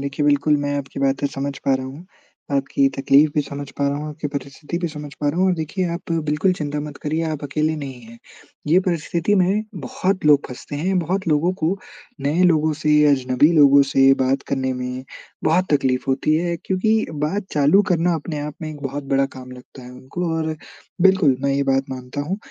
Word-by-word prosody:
देखिए, 140 +1 -2
बिल्कुल 145 +1 +3
मैं 145 0 -1
आपकी 135 0 -7
बातें 135 +1 +1
समझ 140 0 -4
पा 135 - +3
रहा 130 0 -3
हूँ। 145 +7 -10 0.5
आपकी 135 0 +2
तकलीफ़ 140 +2 +4
भी 150 - +3
समझ 140 0 -7
पा 140 - +1
रहा 140 - -1
हूँ, 150 +1 -5
आपकी 150 0 -5
परिस्थिति 140 +4 -5
भी 175 -1 -2
समझ 150 -2 -8
पा 145 - +1
रहा 160 +5 -1
हूँ। 190 - +4
और 185 - +3
देखिए, 165 +3 -3
आप 170 0 -5
बिल्कुल 160 +3 +1
चिंता 150 -3 -3
मत 150 -1 -7
करिये। 155 +2 -1
आप 155 -1 -5
अकेले 155 +2 0
नहीं 135 -4 -7
हैं। 115 +1 -14 0.5
ये 165 +4 +5
परिस्थिति 170 +1 0
में 195 +2 +2
बहुत 185 +5 -2
लोग 145 -1 +5
फँसते 130 +3 -7
हैं, 185 +5 0
बहुत 185 +3 -2
लोगों 160 +4 +2
को 170 +5 +1 0.4
नए 150 +6 +1
लोगों 155 -2 +3
से, 150 0 +1 0.2
अजनबी 130 +2 +3
लोगों 140 -2 +6
से 135 0 +6
बात 135 +1 +1
करने 130 -1 -1
में 125 0 -5 0.4
बहुत 170 +4 +3
तकलीफ़ 130 -3 +1
होती 135 +3 +1
है 170 +1 -1
क्योंकि 220 +4 +1 0.2
बात 195 +6 -2
चालू 150 +7 +4
करना 175 0 +2
अपने 155 -1 -4
आप 150 0 -5
में 155 - -4
एक 150 -2 -10
बहुत 140 +1 -4
बड़ा 135 0 +3
काम 130 0 -10
लगता 125 +1 -13
है 125 - -10
उनको 130 +8 -5
और 160 -1 -2 0.5
बिल्कुल 185 -9 +4
मैं 140 0 +1
ये 140 - +1
बात 135 0 0
मानता 130 +2 -5
हूँ। 160 +7 -2
150 Hz, 210 wpm, -21 LUFS, 135-165 Hz, 0.5 s, लोगों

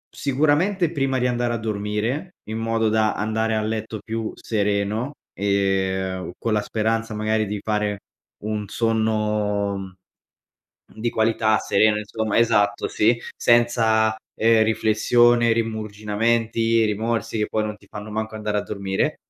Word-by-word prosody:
sicuramente 155 +6 +1
prima 135 -4 0
di 125 - 0
andare 120 -1 0
a 115 - -1
dormire, 110 - -3
in 110 +1 -3
modo 115 -1 +1
da 110 0 +2
andare 110 +1 0
a 110 - 0
letto 110 0 -3
più 110 0 -4
sereno, 105 +4 -1 0.2
ehm, 95 -2 -1
con 115 - -1
la 105 - +2
speranza, 115 0 -1
magari, 110 0 0
di 105 0 -3
fare 105 -1 -1 0.5
un 105 -1 -3
sonno, 105 -2 0
mhmm, 95 -1 -8 1.1
di 120 - +1
qualità, 110 -1 +2
sereno 105 +1 +2
insomma 110 +1 -2
Esatto, 105 -3 +2
sì, 115 +2 +2 0.2
senza, 115 -2 +3 0.2
ehm, 115 0 +5
riflessione, 115 +2 +3
rimuginii, 115 +1 0
rimorsi, 110 +1 -1
che 105 - 0
poi 110 - -1
non 105 0 -4
ti 100 -1 -22
fanno 105 0 -8
manco 110 0 -3
andare 105 -1 -2
a - - +1
dormire. 100 -2 -2
110 Hz, 135 wpm, -23 LUFS, 105-115 Hz, 1.1 s, ehm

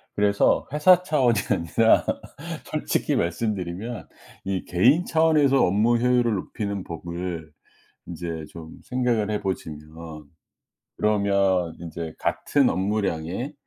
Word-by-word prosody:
그래서 100 0 +2
회사 180 +4 +5
차원이 130 - +2
아니라 100 +5 +3 0.6
솔직히 - - -1
말씀드리면 100 +4 -3 0.4
이 95 -1 -2
개인 130 - +3
차원에서 155 -4 +3
업무 105 +6 +3
효율을 120 -1 +2
높이는 100 0 -4
법을, 85 -1 -6 0.6
인제 85 -2 -5
좀 80 -1 -11
생각을 120 -4 0
해 105 - -1
보시면 80 -4 -6 0.7
그러면 100 -5 +1
인제 85 -1 -6
같은 140 -3 +1
업무량에 95 - -2
100 Hz, 250 characters per minute, -24 LUFS, 85-120 Hz, 0.7 s, 회사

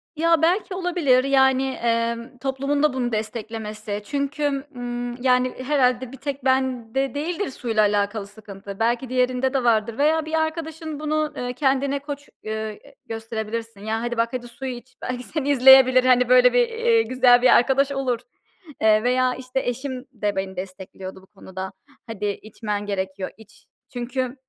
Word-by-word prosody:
Ya, 330 0 +3
belki 365 +4 +1
olabilir. 350 -9 +2
Yani, 265 -1 +4
emm, 235 +1 -2
toplumun 275 +2 -1
da 300 -3 +3
bunu 245 -2 -1
desteklemesi 215 -1 -4
çünkü, 280 +1 -1
ımm, 245 0 -5
yani, 250 0 +2
herhâlde 255 -3 +1
bir 270 - -10
tek 275 -1 -5
bende 260 -1 0
değildir 340 +7 -2
suyla 225 -4 0
alakalı 205 0 0
sıkıntı. 200 -1 -10
Belki 235 +2 0
diğerinde 255 +1 +1
de 265 -2 +1
vardır 225 -1 +2
veya 310 +2 +2
bir 315 - -7
arkadaşın 315 -1 -2
bunu, 305 0 -1
ııı, 245 0 -3
kendine 275 +1 +1
koç, 285 0 -7
eee, 215 - -5 0.3
e, 280 - -17
gösterebilirsin. 225 -1 -5
Ya, 220 +2 -2
hadi 240 0 -3
bak 230 0 +2
hadi 245 -1 -4
suyu 260 +2 -6
iç 250 +1 -14
belki 250 0 -4
seni 285 +1 -3
izleyebilir 260 -1 +7
hani, 250 -1 +4
böyle 250 0 +6
bir, 485 -1 +4
eee, 465 0 +2
güzel 250 - +4
bir 255 - +5
arkadaş 275 +3 +2
olur, 265 -4 -1 0.6
eee, 215 0 +4
veya 255 +1 +2
işte 255 0 -3
eşim 260 +1 -4
de 210 -3 -2
beni 190 0 -3
destekliyordu 190 0 -8
bu 190 - -21
konuda. 190 -1 -8 0.4
Hadi 215 -2 -5
içmen 210 0 -4
gerekiyor 190 -1 -3
iç. 220 -1 -18 0.3
Çünkü 250 +1 -3
250 Hz, 160 wpm, -23 LUFS, 225-275 Hz, 0.6 s, izleyebilir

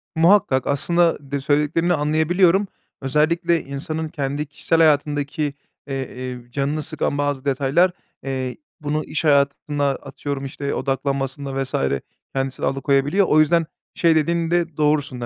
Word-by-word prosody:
Muhakkak 165 -5 +4
aslında 170 +4 +2
de 140 - 0
söylediklerini 150 +5 +1
anlayabiliyorum. 170 +6 +2 0.3
Özellikle 165 +5 +1
insanın 155 +3 -4
kendi 145 0 -3
kişisel 155 +3 -1
hayatındaki, 145 -1 +2 0.3
eee, 135 -1 -2
eee, 125 -1 -7
canını 145 +3 -1
sıkan 155 -2 -2
bazı 145 -1 -1
detaylar, 140 +7 +2 0.3
eee, 130 -2 -3 0.2
bunu 150 +1 -1
iş 155 - -3
hayatında, 145 0 +2
atıyorum, 140 -1 -5
işte, 140 +1 -4
odaklanmasında 135 0 -2
vs. 130 - -4 0.6
kendisini 135 -1 -2
alıkoyabiliyor. 140 +7 +2
O 155 - +5
yüzden 165 +2 +4 0.3
şey 165 -2 +3
dediğinde 170 0 +1
doğrusun 150 -4 +1
da, - - -2
145 Hz, 125 wpm, -22 LUFS, 135-160 Hz, 0.6 s, O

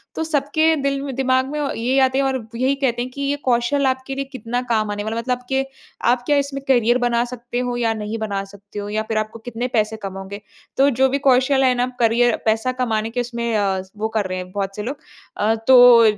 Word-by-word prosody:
तो 320 - -1
सबके 315 +1 +2
दिल 275 0 0
म 275 - -4
दिमाग 260 -1 +2
में 300 - -3
औ 285 -2 -1
ये 255 +4 +1
आते 260 0 +2
हैं 275 - +2
और 260 -4 -2
यही 260 +3 +1
कहते 245 -3 0
हैं 250 - -3
कि 280 - -7
ये 280 +1 0
कौशल 250 +3 +2
आपके 260 +1 -2
लिए 275 0 -3
कितना 245 -2 -4
काम 215 -2 +1
आने 205 0 -3
वाला 220 +1 -3
है? 230 - -1
मतलब 250 0 -1
के 270 0 +1 0.4
आप 245 0 +2
क्या 290 -1 +3
इसमें 280 -1 -2
करियर 240 -2 +4
बना 240 -1 +1
सकते 240 0 -5
हो 245 -1 -2
या 225 -2 +1
नहीं 215 +1 -4
बना 200 -3 -2
सकते 200 +1 -10
हो 205 - -5
या 215 +1 -1
फिर 220 - 0
आपको 215 +1 -3
कितने 245 +1 -4
पैसे 220 0 +1
कमाओगे? 195 +1 -6 0.4
तो 275 +1 +5
जो 265 +1 +2
भी 280 +2 0
कौशल 265 0 +3
है 255 -1 +4
ना 245 +1 +1
करियर 235 +1 +3
पैसा 225 +3 +1
कमाने 220 -2 0
के 245 +1 -1
उसमें 235 -1 -3
अ, 195 -2 0 0.2
वो 220 +1 -1
कर 205 - +1
रहे 185 0 -4
हैं 180 0 -8
बहुत 195 -1 -3
से 210 - -4
लोग। 275 +5 -4 0.4
अ, 220 +2 +2
तो 245 -2 +8
245 Hz, 240 wpm, -21 LUFS, 220-265 Hz, 0.4 s, तो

